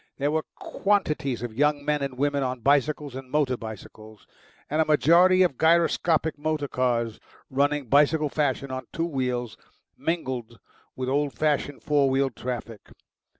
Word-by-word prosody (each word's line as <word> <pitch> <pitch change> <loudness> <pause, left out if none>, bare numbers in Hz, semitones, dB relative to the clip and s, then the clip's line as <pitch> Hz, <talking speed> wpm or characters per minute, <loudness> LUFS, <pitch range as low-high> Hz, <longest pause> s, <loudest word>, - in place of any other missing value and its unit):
There 145 +1 0
were 155 0 -1
quantities 150 - -1
of 120 -2 -5
young 145 +2 +1
men 150 -1 0
and 135 -2 -4
women 145 +1 0
on 130 -2 -2
bicycles 145 +2 +1
and 130 0 -8
motor 140 -3 +1
bicycles, 110 -1 -10 0.4
and 155 +2 +1
a - - +2
majority 175 +5 +5
of 170 -8 -1
gyroscopic 160 -1 +2
motor 155 -1 -1
cars 120 -4 -1 0.3
running 145 +1 +1
bicycle 150 +4 +3
fashion 140 -2 -1
on 130 -2 -5
two 165 - -2
wheels, 125 -6 -3 0.4
mingled 130 -8 -3 0.4
with 130 -1 -4
old 140 +1 0
fashioned 145 -2 -1
four 145 -2 +2
wheeled 135 -2 0
traffic. 120 -3 -6
140 Hz, 150 wpm, -25 LUFS, 130-150 Hz, 0.4 s, majority